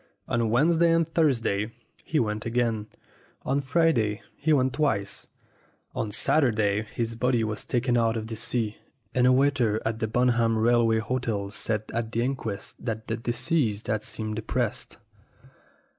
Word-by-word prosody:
On 115 -2 +1
Wednesday 165 +8 +4
and 165 -1 +3
Thursday 115 -10 +1 0.3
he 155 - 0
went 105 -2 -1
again. 115 -2 0 0.6
On 140 +2 0
Friday 130 -8 +1
he 155 +2 0
went 130 -3 +3
twice. 105 -10 -1 0.7
On 110 - -2
Saturday 110 -3 +2
his 115 +1 -3
body 120 0 +1
was 110 -1 -3
taken 120 0 0
out 115 -1 +2
of 110 - -4
the 110 0 -5
sea, 115 -1 -1 0.4
and 125 0 +3
a - - +6
waiter 130 -5 +2
at 110 0 -1
the 110 - 0
Bunham 115 -1 +2
Rail 120 +1 +4
way 110 0 +3
Hotel 110 -3 -2
said 110 0 -1
at 115 -1 -2
the 115 0 0
inquest 120 -6 -4
that 110 -2 -4
the 115 - 0
deceased 120 -1 0
had 110 -1 -1
seemed 110 0 -4
depressed. 110 0 -2
115 Hz, 155 wpm, -26 LUFS, 110-130 Hz, 0.7 s, a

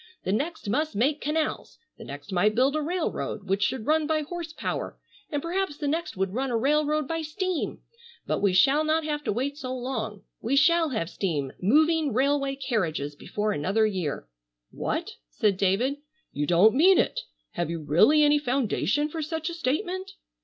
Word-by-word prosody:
The - - -1
next 290 - -2
must 300 +8 0
make 280 +8 +1
canals, 305 +1 -2 0.2
the - - -8
next 145 +3 -9
might 205 +4 +2
build 265 +4 +3
a 310 - 0
railroad 320 - -2
which 195 +1 0
should 225 +1 0
run 310 0 +2
by 310 -1 +1
horse 340 +1 -6
power, - - -4 0.3
and 290 -2 -2
perhaps 355 -2 -2
the 290 - -3
next 325 - -2
would 190 0 -1
run 265 +3 -1
a 235 - +1
railroad 300 +3 +1
by 325 0 -2
steam. 365 +2 -3 0.4
But - - -1
we 200 - +3
shall 270 +12 +4
not 315 +1 +1
have 295 -1 -3
to - - +1
wait 275 +7 -2
so 255 -2 -4
long. 225 -5 -4 0.2
We 240 +5 0
shall 325 +2 +4
have 220 - -2
steam 150 -8 -2
moving 305 - +3
railway 275 +2 +1
carriages 170 - -2
before 210 +8 -2
another 200 +6 +1
year." 180 - -2 0.4
"What!" - - -3 0.2
said 200 - +1
David, 200 +9 +1 0.4
"you 145 +1 -1
don't 180 +6 +5
mean 355 +7 +6
it! - - +1 0.3
Have 175 -2 -2
you 170 0 -3
really 180 - +4
any 295 0 +4
foundation 265 - 0
for 315 +1 -5
such 320 +2 -3
a - - -6
statement?" 360 +5 -2
275 Hz, 180 wpm, -26 LUFS, 205-310 Hz, 0.4 s, mean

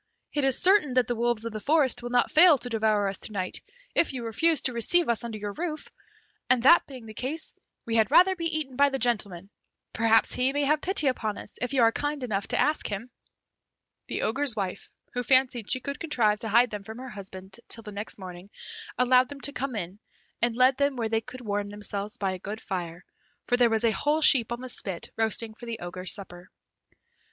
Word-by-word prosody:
It 290 - 0
is 270 -2 +3
certain 365 -8 +4
that 255 -1 +3
the 240 - -2
wolves 235 -1 0
of 230 - -5
the 215 - -4
forest 280 0 +3
will 240 - -5
not 245 0 +1
fail 325 -1 +7
to 245 - -6
devour 215 -3 +1
us 195 - -3
to - - -7
night, 185 -3 -3 0.3
if 325 - +2
you 245 -3 -5
refuse 315 +8 +3
to 255 - -1
receive 330 +9 +2
us 235 -1 0
under 230 -2 -5
your 205 -1 -5
roof, 315 - -5 0.6
and 255 -2 +3
that 340 +6 +6
being 255 -4 -11
the 220 - -10
case, 280 +9 -5 0.3
we 230 0 -1
had 220 -1 +3
rather 375 +2 +5
be 335 -2 -5
eaten 310 -5 -2
by 285 +2 +4
the 270 - -2
gentleman; 200 -7 -1 0.4
perhaps 225 0 +3
he 255 +1 +1
may 290 0 0
have 300 +2 +1
pity 370 -5 +2
upon 220 -5 -1
us, - - -10
if 250 - -2
you 265 -4 +3
are 225 - +5
kind 290 +2 -3
enough 205 -5 -2
to - - -1
ask 305 +1 +1
him." 220 +5 -6 1.0
The - - -3
Ogre's 260 +2 +1
wife, 195 -2 -5 0.2
who 245 - -1
fancied 255 -3 +2
she 255 - +2
could 280 +3 -6
contrive 225 -10 +1
to 225 - -5
hide 235 +3 +4
them 210 -1 -6
from 220 +2 -9
her 260 +1 -8
husband 190 -1 -9
till 230 - -4
the 210 - -9
next 205 +2 -6
morning, 185 0 -10 0.5
allowed 250 +1 +4
them 285 -1 -10
to 285 - 0
come 265 -3 -3
in, 190 0 -5 0.4
and 235 -1 +1
led 255 +2 +4
them 280 -1 +1
where 230 -3 -2
they 225 0 0
could 250 +3 -10
warm 205 -3 -2
themselves 205 0 -5
by 195 -2 -1
a 185 - -6
good 205 +4 -6
fire, 175 -4 -6 0.4
for 245 - +2
there 245 -1 +4
was 225 0 0
a 230 - +3
whole 300 +7 0
sheep 240 -6 +5
on 240 +1 -4
the 255 - -6
spit 195 -7 -3
roasting 225 0 +1
for 240 +2 -11
the 230 -1 -4
Ogre's 180 0 -2
supper. 180 -3 -7
235 Hz, 225 wpm, -26 LUFS, 210-270 Hz, 1.0 s, fail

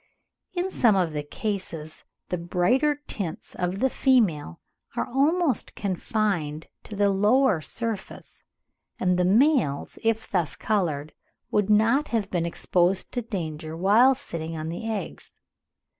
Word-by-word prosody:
In 360 +2 -1
some 230 - +4
of 175 -5 +1
the 150 - -2
cases, 165 -2 -5 0.3
the 180 - -1
brighter 255 - +1
tints 175 -6 -4
of 180 +1 -2
the 265 +6 +2
female 190 - +2 0.4
are - - 0
almost 285 - +1
confined 185 -6 -1 0.2
to 210 - -8
the 200 0 +3
lower 210 0 +3
surface, 225 +3 -5 0.6
and 180 -1 +2
the 180 - +3
males, 220 - +2
if 225 0 0
thus 175 -5 -1
coloured, 155 -8 -1 0.4
would 210 -1 +1
not 230 +8 +4
have 225 -4 -1
been 170 -2 0
exposed 175 +2 +1
to 245 - -2
danger 160 -7 -5
whilst 230 +9 +4
sitting 165 0 -5
on 155 +1 -4
the 200 +7 -4
eggs. 215 - -6
195 Hz, 135 wpm, -25 LUFS, 170-230 Hz, 0.6 s, some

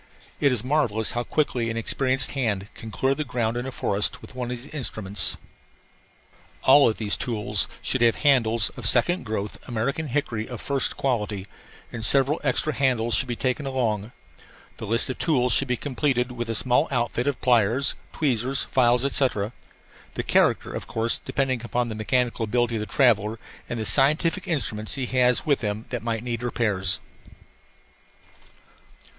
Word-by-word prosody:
It 140 - +3
is 120 -4 -1
marvellous 125 -6 0
how 120 - -2
quickly 125 -5 -1
an 115 - -3
experienced 130 +3 0
hand 105 -7 -2
can 115 - -9
clear 130 +5 0
the 150 - -3
ground 120 -5 -2
in 120 +2 -3
a - - -4
forest 100 -4 0
with - - -13
one 125 -1 -4
of 125 - -3
these 145 - -13
instruments. 110 -8 0 1.3
All 140 -1 +6
of 110 - -3
these 105 -2 0
tools 105 -4 0 0.2
should 130 - -1
have 115 -1 +4
handles 115 -6 +3
of 125 -6 -2
second 130 - +3
growth 105 -1 -4
American 130 +6 -2
hickory 120 -5 -2
of 120 -3 -6
first 140 -2 +1
quality; 105 -7 -2 0.5
and 115 -2 -5
several 135 +6 +4
extra 150 +3 +1
handles 125 -4 +1
should 130 - +3
be 120 - -3
taken 130 +4 -2
along. 115 -5 -1 0.7
The 110 - -7
list 115 +3 +3
of - - -8
tools 125 -7 +2
should 135 - +2
be 125 -1 0
completed 130 -2 -1
with 120 -1 -5
a 115 - -1
small 125 +7 +2
outfit 120 0 -1
of 145 - -1
pliers, 120 +2 +3 0.2
tweezers, 130 -2 +1
files, 125 0 +2
etc. 125 -6 0 0.6
the - - -2
character, - - +2
of - - -6
course, 115 +1 0
depending 130 -3 -1
upon 120 0 -1
the - - -4
mechanical 115 +2 0
ability 120 +1 0
of - - -3
the 105 - -4
traveller 110 -2 +2 0.3
and 120 - -3
the 110 - -3
scientific 155 - +2
instruments 110 - -1
he 135 -2 -2
has 125 -1 +2
with 145 -3 +1
him 105 0 -3
that 120 -3 -3
might 115 -1 -3
need 120 -2 -3
repairs. 105 -6 0
120 Hz, 170 wpm, -24 LUFS, 110-135 Hz, 1.3 s, All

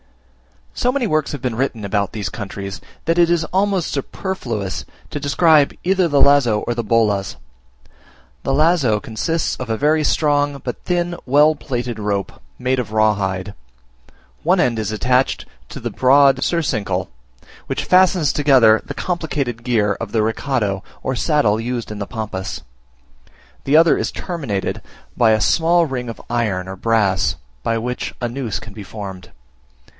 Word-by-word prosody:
So 250 - +1
many 265 -2 0
works 155 -7 0
have 145 - -6
been 125 -2 -1
written 115 -3 -2
about 100 0 -1
these 100 -4 -4
countries, 100 -1 -6 0.2
that 165 +1 +1
it 170 -1 +5
is 170 -1 +2
almost 195 -2 +1
superfluous 125 - -4 0.3
to - - -3
describe 145 +1 +3
either 185 0 +2
the 145 -3 +2
lazo 130 -7 +4
or 120 - -2
the 120 0 -3
bolas. 105 -3 +1 1.1
The 135 - -1
lazo 145 -7 +3
consists 155 +11 -2
of 130 -2 -6
a 110 - 0
very 155 +3 +2
strong, 145 -1 +1
but 125 - -5
thin, 175 -1 -1
well 145 +4 +5
plaited 125 -5 -4
rope, 100 -2 -3 0.2
made 130 +1 0
of 110 -3 -4
raw 110 0 +4
hide. 95 0 -3 0.9
One - - +2
end 115 -3 +2
is 110 0 -2
attached 125 +4 +1 0.2
to - - -8
the - - -4
broad 135 +1 +4
surcingle, 105 - -1 0.6
which - - -2
fastens 180 -5 +4
together 130 -7 +5
the - - -7
complicated 145 -9 -3
gear 110 -4 +1
of 115 -3 -6
the 115 - +2
recado, 110 -3 -1 0.2
or 130 - -1
saddle 120 -7 +2
used 120 -1 -3
in 105 - -6
the 100 - -4
Pampas; 100 -4 -5 1.0
the 145 +3 +4
other 165 +1 +5
is - - -2
terminated 140 - -3 0.3
by 115 -2 +4
a 110 0 +2
small 165 +9 +3
ring 125 -4 -4
of 115 - -7
iron 105 -6 -1
or 95 0 -7
brass, 95 -7 +1 0.3
by 115 - 0
which 125 +2 -4
a 120 - -1
noose 120 -3 -3
can 110 -2 -11
be 105 - -8
formed. 95 -3 -8
120 Hz, 160 wpm, -19 LUFS, 105-150 Hz, 1.1 s, it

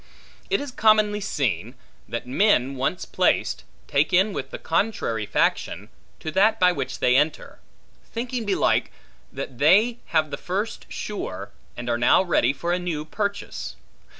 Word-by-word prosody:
It 395 - +2
is 285 -2 -5
commonly 215 -3 +3
seen, 130 - -2 0.3
that 120 - -4
men, 135 - +2
once 135 +7 -2
placed, - - +1 0.2
take 145 +2 +2
in 190 +3 +3
with 135 - -4
the - - -6
contrary 160 - -1
faction, - - 0 0.3
to 155 - -4
that 215 +5 +3
by 180 0 +5
which 175 - -4
they 125 - +3
enter: 150 +3 0 0.5
thinking 240 +1 -3
belike, 200 -3 +1 0.4
that 125 -2 -7
they 210 +11 +4
have 155 -2 +1
the - - -3
first 205 +5 -4
sure, 200 - -5 0.3
and - - -5
now 120 +9 +5
are - - -10
ready 135 -7 +3
for 170 +5 -2
a 180 - 0
new 165 -4 -3
purchase. 200 +4 -4
180 Hz, 150 wpm, -24 LUFS, 140-210 Hz, 0.5 s, by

